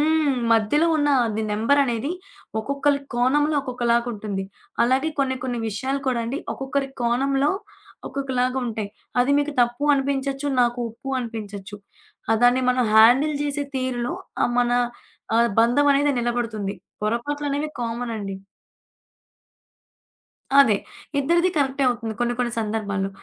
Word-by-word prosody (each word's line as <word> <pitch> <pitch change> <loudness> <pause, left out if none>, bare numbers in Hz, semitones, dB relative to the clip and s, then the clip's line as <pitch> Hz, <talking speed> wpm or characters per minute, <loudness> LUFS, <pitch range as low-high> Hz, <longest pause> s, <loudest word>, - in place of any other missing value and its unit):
హ్మ్. 305 -3 +2 0.2
మధ్యలో 225 +9 +3
ఉన్న 290 -1 +1 0.2
అది 220 0 -2
నంబరనేది 245 +4 +1 0.5
ఒక్కొక్కళ్ళకి 280 +3 0
కోణంలో 290 +5 +2
ఒక్కొక్కలాగుంటుంది. 235 -5 -1 0.4
అలాగే 265 +6 +1
కొన్ని 260 -1 +1
కొన్ని 245 -2 -2
విషయాలు 265 +6 -2
కూడా 245 -2 +1
అండి. 270 +5 -3
ఒక్కొక్కరి 270 +1 -2
కోణంలో 270 +4 +2 0.6
ఒక్కొక్కలాగుంటాయి. 255 -5 -2 0.3
అది 255 +3 +3
మీకు 300 +1 -2
తప్పు 240 +3 +1
అనిపించచ్చు, 275 0 -1
నాకు 240 0 +2
ఒప్పు 230 +4 -11
అనిపించచ్చు. 210 -3 -7 0.5
ఆ 225 - +5
దాన్ని 250 +1 +4
మనం 250 -1 +2
హ్యాండిల్ 255 +7 +6
జేసే 290 0 -2
తీరులో 255 +2 -2 0.3
ఆ - - +3
మన 245 0 +1 0.6
ఆహ్, 235 0 +4
బంధం 245 +5 +3
అనేది 285 +1 +2
నిలబడుతుంది. 230 -4 -2 0.3
పొరపాట్లనేవి 290 +6 -1
కామన్ 235 0 -3
అండి. 195 -2 -5 2.3
అదే. 225 -7 +6 0.4
ఇద్దరిది 340 +6 +2
కరెక్టే 275 -1 +1
అవుతుంది 235 -2 -1
కొన్ని 240 0 +1
కొన్ని 240 -1 0
సందర్భాల్లో. 205 -3 -2
250 Hz, 120 wpm, -23 LUFS, 230-280 Hz, 2.3 s, హ్యాండిల్